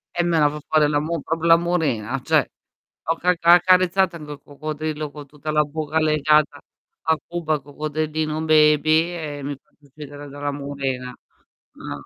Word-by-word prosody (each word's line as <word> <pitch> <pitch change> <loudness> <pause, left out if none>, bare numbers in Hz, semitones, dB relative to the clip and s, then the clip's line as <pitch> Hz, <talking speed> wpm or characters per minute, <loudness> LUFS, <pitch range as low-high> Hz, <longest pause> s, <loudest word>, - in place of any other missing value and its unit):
Eh 175 - +1
me 165 -2 +2
la 145 -1 +4
fa 150 +1 -7
fare 155 -1 +4
la 145 -1 +1
mu 160 +3 -3
proprio 165 +2 -2
la 165 - +8
murena, 135 -8 -1
cioè. - - +4 0.6
Ho - - +4
ca 180 - +1
ha 170 0 +7
accarezzato 185 0 +4
anche 150 -1 -10
il 145 - -13
coccodrillo 155 +1 -5
con 145 0 -10
tutta 150 +2 -6
la 150 0 +3
bocca 155 +1 -2
legata 155 -1 +2 0.4
a 160 -1 +2
Cuba, 160 -3 -2
coccodrillino 155 +2 -3
baby, 155 +1 +4
e 150 -3 -6
mi 145 +1 -4
faccio 150 - -30
uccidere 145 0 -11
dalla 145 +1 -4
murena. 135 -3 -4 0.6
No, 70 -1 -8
150 Hz, 170 wpm, -22 LUFS, 145-160 Hz, 0.6 s, la